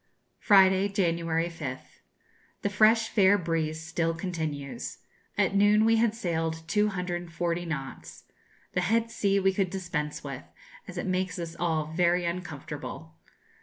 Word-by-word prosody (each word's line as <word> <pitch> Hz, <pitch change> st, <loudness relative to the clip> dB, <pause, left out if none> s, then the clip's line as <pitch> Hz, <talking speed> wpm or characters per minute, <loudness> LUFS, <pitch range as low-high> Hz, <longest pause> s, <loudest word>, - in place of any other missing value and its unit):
Friday, 190 Hz, -1 st, +5 dB
January 170 Hz, -4 st, 0 dB
5th. 150 Hz, -6 st, -7 dB, 0.6 s
The 200 Hz, -, 0 dB
fresh 220 Hz, +2 st, +5 dB
fair 200 Hz, -1 st, +5 dB
breeze 160 Hz, -2 st, -2 dB
still 165 Hz, 0 st, -1 dB
continues. 160 Hz, -6 st, -4 dB, 0.4 s
At -, -, +2 dB
noon 205 Hz, +2 st, +5 dB
we 225 Hz, 0 st, +4 dB
had 225 Hz, -1 st, +2 dB
sailed 165 Hz, -5 st, -2 dB
240 175 Hz, -4 st, -1 dB
knots. 135 Hz, -4 st, -6 dB, 0.5 s
The 180 Hz, -, +1 dB
head 225 Hz, +5 st, +1 dB
sea 200 Hz, -1 st, +1 dB
we 190 Hz, 0 st, +2 dB
could 190 Hz, -1 st, 0 dB
dispense 175 Hz, -6 st, -3 dB
with, -, -, -6 dB, 0.5 s
as -, -, -8 dB
it -, -, -2 dB
makes 185 Hz, 0 st, -1 dB
us 170 Hz, -1 st, -5 dB
all 160 Hz, -3 st, -1 dB
very 175 Hz, +1 st, +2 dB
uncomfortable. 175 Hz, +1 st, -6 dB
175 Hz, 130 wpm, -28 LUFS, 165-195 Hz, 0.6 s, Friday